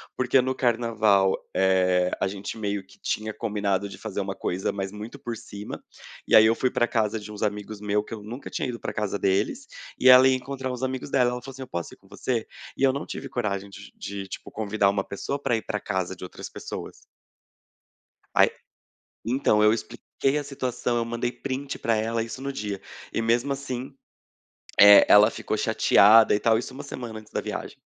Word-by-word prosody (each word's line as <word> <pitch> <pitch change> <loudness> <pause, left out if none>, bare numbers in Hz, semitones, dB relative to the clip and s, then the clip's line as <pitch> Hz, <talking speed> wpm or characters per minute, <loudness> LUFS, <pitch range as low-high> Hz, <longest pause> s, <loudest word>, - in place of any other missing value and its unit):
porque 130 +1 +3
no 130 +1 -2
carnaval, 110 -6 +2 0.2
eh, 90 -1 +3
a - - +3
gente 100 +2 -6
meio 100 -3 -3
que 95 - -19
tinha 110 0 -2
combinado 100 -3 -1
de - - -10
fazer 105 -2 -4
uma 95 0 -3
coisa, 95 0 -2
mas 95 -1 -4
muito 110 +6 -8
por 120 -2 -5
cima, 105 -1 -8 0.5
e - - -4
aí 110 - +8
eu 115 +1 +4
fui 130 +1 0
pra 120 - +1
casa 110 -2 0
de 105 0 -9
uns 105 - -5
amigos 105 0 -3
meus 105 0 0
que - - -8
eu 105 -2 -7
nunca 120 +6 -8
tinha 130 - -3
ido 120 - -5
pra - - -5
casa 105 -2 -2
deles, 95 0 0 0.3
e 130 - +3
ela 130 0 +9
ia 130 - +3
encontrar 130 0 -4
uns 125 0 -6
amigos 130 +1 -3
dela. 125 -2 +3
Ela 125 0 -5
falou 135 - -9
assim: 135 - -10
“Eu - - -11
posso 85 -5 -5
ir - - -15
com - - -25
você?”. 120 -4 -2 0.3
E - - -2
eu 130 -1 +5
não 140 - -4
tive - - -6
coragem 100 -4 -3 0.3
de, 100 -1 -6
tipo, - - -8
convidar 105 -2 +1
uma 100 0 0
pessoa 120 +9 -4
pra 120 - +1
ir 110 - -4
pra - - -3
casa 95 -2 -2
de 90 - -12
outras 90 - -8
pessoas. - - -7 1.4
Aí - - +6 0.8
então 115 -3 +2
eu 105 +1 +6
expliquei 135 +4 -2
a 145 - -2
situação, 125 -3 -2
eu 115 - 0
mandei 120 +1 -2
print 135 +1 -5
pra 115 -1 +1
ela 115 +1 -1
isso 115 +3 -7
no 140 0 -3
dia, 105 -5 -4 0.3
e 115 - 0
mesmo 120 +4 +1
assim, 135 0 -6 0.9
eh, 105 0 +10
ela 105 +2 +7
ficou - - -3
chateada 110 +1 +5
e 105 - +1
tal, 110 -1 +3
isso 130 +2 -6
uma 140 - -7
semana 115 -3 -7
antes 110 0 -15
da - - -1
viagem. - - -6
110 Hz, 210 wpm, -25 LUFS, 100-125 Hz, 1.4 s, eh